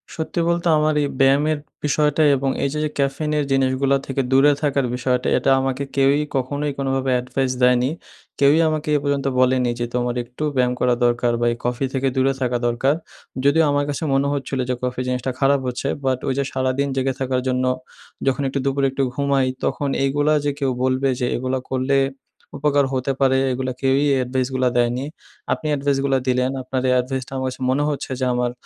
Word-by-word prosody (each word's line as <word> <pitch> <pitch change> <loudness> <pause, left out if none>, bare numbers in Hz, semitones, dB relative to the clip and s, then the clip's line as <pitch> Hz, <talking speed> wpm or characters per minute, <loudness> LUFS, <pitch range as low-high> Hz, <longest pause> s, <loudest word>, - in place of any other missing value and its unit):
সত্যি 160 +2 -3
বলতে 170 0 0
আমার 155 0 +2
এই 145 - +1
ব্যায়ামের 145 +3 +3 0.3
বিষয়টা 150 +1 +1
এবং 135 0 -1
এই 140 - +1
যে, 150 - -2
যে 155 - 0
caffeine 140 +2 -1
এর 150 - +1
জিনিসগুলো 135 +1 +2
থেকে 135 0 -1
দূরে 135 +2 +6
থাকার 140 -3 +1
বিষয়টা 125 0 0
এটা 130 - 0
আমাকে 135 +1 -1
কেউই 140 +2 +3
কখনোই 145 +3 -1
কোনোভাবে 135 -1 -1
advice 130 +1 -2
দেয়নি। 125 0 +4 0.5
কেউই 145 +3 +5
আমাকে 155 0 -3
এ - - +5
পর্যন্ত 140 -1 -1
বলেনি 125 -1 +3
যে, 120 - 0
"তোমার 120 0 -1
একটু 125 +5 -8
ব্যায়াম 125 -1 +2
করা 125 -1 +3
দরকার 120 0 +2
বা 120 - +2
এই 120 - -4
Coffee 125 +2 0
থেকে 135 0 0
দূরে 135 +1 +2
থাকা 125 -1 +1
দরকার।" 120 +4 +1 0.5
যদিও 160 +3 +5
আমার 145 0 +1
কাছে 145 +2 -3
মনে 135 +1 +2
হচ্ছিলো 135 -1 -2
যে - - +2
coffee 125 0 -2
জিনিসটা 125 +1 -1
খারাপ 140 0 +3
হচ্ছে 125 +2 -3 0.2
but 130 -1 +1
ওই 135 - +1
যে 140 - +1
সারাদিন 130 +2 0
জেগে 135 0 0
থাকার 130 -1 0
জন্য 130 0 0 0.6
যখন 135 +1 +1
একটু 140 +1 -2
দুপুরে 140 0 +1
একটু 135 +1 -1
ঘুমাই 140 -1 +1 0.2
তখন 145 - -1
এইগুলা 145 +2 +2
যে 145 - +2
কেউ 135 -2 +1
বলবে 130 +1 +1
যে 125 - 0
এগুলো 130 +1 -1
করলে 130 +1 +1 0.6
উপকার 145 -1 +2
হতে 130 +1 -1
পারে, 130 -1 +3
এগুলো 130 0 -2
কেউই 135 +1 +2 0.2
advice 130 +1 -1
গুলো 130 0 +2
দেয়নি। 120 +2 +1 0.5
আপনি 155 - -5
advice 140 0 0
গুলো 135 -1 +2
দিলেন 125 0 +1
আপনার 130 0 -2
এই - - +4
advice 130 0 -4
টা - - -11
আমার 130 0 -2
কাছে 130 - -10
মনে 140 +3 +1
হচ্ছে 140 -2 -4
যে 130 - 0
আমার 125 0 0
135 Hz, 195 wpm, -21 LUFS, 130-140 Hz, 0.6 s, দূরে